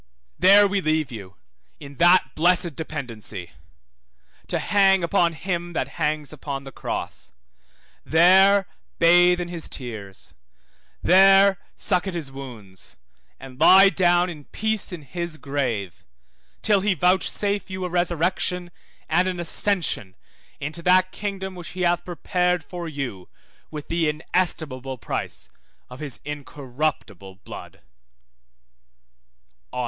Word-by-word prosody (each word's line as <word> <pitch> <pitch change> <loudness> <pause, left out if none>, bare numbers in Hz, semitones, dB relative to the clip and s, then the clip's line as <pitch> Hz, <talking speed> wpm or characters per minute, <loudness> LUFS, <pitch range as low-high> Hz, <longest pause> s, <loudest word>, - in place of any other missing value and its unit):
There 200 +3 +7
we 200 0 -1
leave 155 -4 0
you 100 -4 -9 0.4
in 140 -1 -11
that 175 +2 +4
blessed 175 -1 +2
dependency, 115 - -5 1.0
to - - -1
hang 195 -2 +3
upon 170 -1 +2
him 175 +1 -4
that 135 -4 -2
hangs 150 0 -1
upon 140 -2 -6
the 135 - -10
cross, - - -6 0.7
there 190 +4 +5 0.3
bathe 175 +1 +5
in 175 - -3
his 170 -2 -6
tears, 110 -7 -8 0.7
there 195 +1 +6 0.2
suck 185 -1 0
at 185 - -4
his 155 -5 -5
wounds, 115 -9 -11 0.4
and 130 -1 -12
lie 195 +4 +8
down 175 -1 +3
in 155 -5 -9
peace 220 -2 -2
in 170 -4 -7
his 170 +3 -5
grave, 125 - -3 0.6
till 210 -2 +3
he 200 -1 +1
vouchsafe 190 +4 +1
you 185 -1 -4
a - - -3
resurrection, 175 +1 -1 0.4
and 175 +3 +2
an 180 -1 -3
ascension 170 - 0 0.4
into 155 +4 -5
that 185 +1 +3
kingdom 195 -2 -5
which 175 -3 -9
He - - -3
hath 175 0 +1
prepared 180 0 -1
for 175 +1 -7
you 130 - -6 0.4
with 150 -2 -8
the 165 -2 0
inestimable 150 -5 -2
price - - -5 0.4
of 125 - -10
his 145 -5 -5
incorruptible 135 - -5
blood. - - -11
170 Hz, 125 wpm, -23 LUFS, 140-185 Hz, 1.0 s, lie